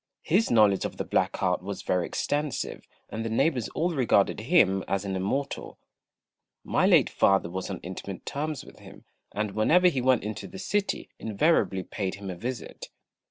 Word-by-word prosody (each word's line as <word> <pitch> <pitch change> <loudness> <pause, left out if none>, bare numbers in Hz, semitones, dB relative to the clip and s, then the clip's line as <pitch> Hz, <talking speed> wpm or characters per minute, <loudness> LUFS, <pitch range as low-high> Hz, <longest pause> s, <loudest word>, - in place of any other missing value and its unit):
His 195 +8 +2
knowledge 105 -4 +4
of - - -4
the - - -2
black - - 0
art - - +1
was 100 +1 -6
very 90 -2 0
extensive, 145 -2 -2 0.2
and 110 - -4
the 115 - -3
neighbours 125 +1 +1
all 175 +3 +1
regarded 120 -10 +2
him 105 - +3
as 95 +2 -1
an 95 -1 -2
Immortal. 135 +10 -3 0.9
My - - +2
late - - +5
father 95 -3 +2
was 95 +2 -4
on 95 - -4
intimate 95 +1 -7
terms 150 -1 -4
with - - -15
him, - - -14 0.3
and 105 -1 -2
whenever 165 - +4
he 135 -7 -2
went 130 -3 +3
into 105 -1 -5
the 190 - -10
city 205 +1 -2
invariably 110 - +1
paid 95 -1 -4
him 100 -1 -6
a - - -6
visit. 125 +7 -6
110 Hz, 175 wpm, -27 LUFS, 95-145 Hz, 0.9 s, late